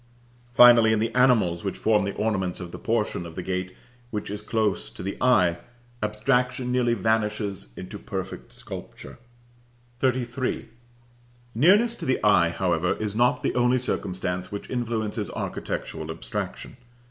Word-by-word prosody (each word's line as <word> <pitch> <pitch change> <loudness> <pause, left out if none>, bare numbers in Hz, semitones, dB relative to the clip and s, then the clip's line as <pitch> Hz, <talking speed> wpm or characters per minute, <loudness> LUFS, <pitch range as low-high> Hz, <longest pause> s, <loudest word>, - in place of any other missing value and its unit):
Finally, 120 -2 +7
in - - +2
the 115 +2 -1
animals 115 -10 +3
which 95 - -3
form 105 -2 +2
the 100 - -3
ornaments 95 -5 -1
of 90 -2 -7
the - - -8
portion 110 -5 -1
of 85 -1 -9
the 90 - -4
gate 95 0 -3 0.3
which 105 -3 -4
is 105 0 -5
close 105 - 0
to - - -9
the 100 - -3
eye, 90 -9 +4 0.4
abstraction 125 +4 0
nearly 120 -2 +2
vanishes 105 - -1
into 95 +3 -7
perfect 95 -1 -6
sculpture. - - -10 0.8
XXXIII. 125 0 -1 0.8
Nearness 205 - +5
to - - -6
the 130 - +2
eye, 95 -5 +5
however, 90 0 0
is 105 -2 -3
not 120 +2 +2
the - - 0
only 125 +1 +3
circumstance 95 -6 -3
which 100 - -6
influences 110 -3 -2
architectural 80 0 -4
abstraction. 80 - -5
105 Hz, 145 wpm, -25 LUFS, 95-120 Hz, 0.8 s, Finally